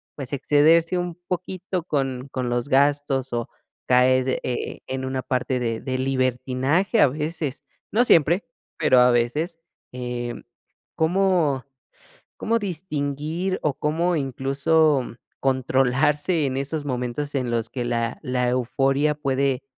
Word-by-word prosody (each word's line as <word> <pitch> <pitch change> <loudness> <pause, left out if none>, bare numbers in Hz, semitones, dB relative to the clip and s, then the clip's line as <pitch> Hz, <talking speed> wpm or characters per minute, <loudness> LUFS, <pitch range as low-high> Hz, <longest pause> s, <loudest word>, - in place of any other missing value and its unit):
pues, 135 -3 -7
excederse 160 +5 +3
un 175 -1 -3
poquito 185 0 -3
con 135 -5 -2
con 125 -2 -2
los 120 +3 -1
gastos 140 -1 +2
o 120 +2 -2 0.4
caer, 130 +1 +3
eh, 125 - -3
en 130 0 -3
una 130 0 -2
parte 130 0 -1
de 115 -2 -2
de 130 -1 -2
libertinaje 130 - +1
a - - +7
veces, 150 0 -4 0.3
no 240 +4 +3
siempre, 170 - +4 0.3
pero 150 -5 +4
a 125 0 +6
veces, 150 +9 0 0.3
em, 125 -1 -5 0.5
¿cómo 165 -6 +2 0.7
cómo 230 +1 +1
distinguir 165 -1 -3
o 150 - +1
cómo 170 +4 0
incluso 140 +1 +2 0.4
controlarse 135 +5 +2
en 130 -1 -2
esos 145 +2 -3
momentos 130 +2 -3
en 125 -3 -1
los 115 -1 -1
que 125 - -4
la 115 -1 -1
la 125 -1 0
euforia 135 +4 +1
puede 135 -2 0
135 Hz, 125 wpm, -23 LUFS, 125-160 Hz, 0.7 s, a